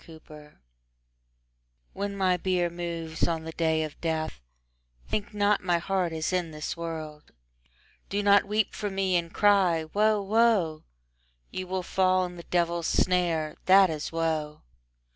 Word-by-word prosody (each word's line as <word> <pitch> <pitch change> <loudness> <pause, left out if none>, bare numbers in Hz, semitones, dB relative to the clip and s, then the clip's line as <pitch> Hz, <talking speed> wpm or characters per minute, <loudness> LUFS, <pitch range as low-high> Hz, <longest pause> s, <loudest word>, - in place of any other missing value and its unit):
VIII 155 -2 -14 1.4
When 200 0 -4
my 185 -2 +2
bier 180 -1 0
moves 170 -2 -3
on 165 -1 -2
the 160 - -6
day 160 -1 0
of 155 -1 -8
death, 160 - -2 0.7
Think 205 -1 -3
not 205 -1 +1
my 175 -2 +2
heart 180 0 -1
is 160 +2 -2
in 180 -2 0
this 150 -1 -5
world. 160 -3 -7 0.8
Do 205 +1 -1
not 200 0 +5
weep 210 0 0
for 210 - -3
me 190 -1 0
and 170 -1 -1
cry 190 -6 +3
"Woe, 215 +1 +3
woe!" 200 -6 +2 0.7
You 185 0 -5
will 185 0 -2
fall 185 0 +2
in 180 0 -8
the 170 - -8
devil's 170 -1 0
snare: 170 -4 +1
that 190 -1 +7
is 155 -1 -4
woe. 160 -2 -2
175 Hz, 145 wpm, -27 LUFS, 160-195 Hz, 1.4 s, that